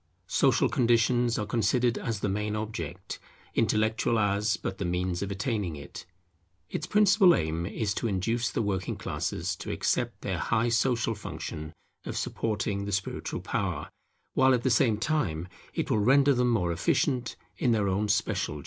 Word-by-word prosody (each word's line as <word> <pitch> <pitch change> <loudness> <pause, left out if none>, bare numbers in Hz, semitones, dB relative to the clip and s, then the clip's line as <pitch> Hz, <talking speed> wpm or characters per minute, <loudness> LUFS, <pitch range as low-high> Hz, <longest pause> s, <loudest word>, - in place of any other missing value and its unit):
Social - - +3
conditions 120 0 +2
are 105 - -1
considered 120 +3 +1
as 115 -6 -3
the - - 0
main 105 +2 -1
object, 105 -8 -5 0.3
intellectual 110 +1 +1
as 105 +1 +1
but 95 - -5
the - - -1
means 90 0 -1
of 100 - -2
attaining 100 -4 -2
it. 70 +4 -10 0.6
Its 155 - -3
principal 200 -3 +5
aim 80 +1 -1
is 105 0 -2
to 115 - -2
induce 115 +4 0
the 105 - -1
working 95 -3 -2
classes - - -3
to - - -7
accept - - -1
their - - -2
high 115 +2 +1
social 115 0 +1
function 80 -6 -6 0.3
of - - -5
supporting 100 -2 -2
the 100 - -4
spiritual 95 0 -3
power, - - -3 0.4
while 130 0 +5
at 120 - -3
the 130 - +2
same 115 -3 +3
time 105 - -1 0.3
it - - -1
will 110 - +3
render 135 +6 +5
them 125 -1 +2
more 95 -8 +1
efficient 125 - 0 0.2
in 125 - +2
their 105 -3 +2
own 100 +3 0
special 100 -7 0
duties. - - -6
110 Hz, 165 wpm, -28 LUFS, 100-120 Hz, 0.6 s, principal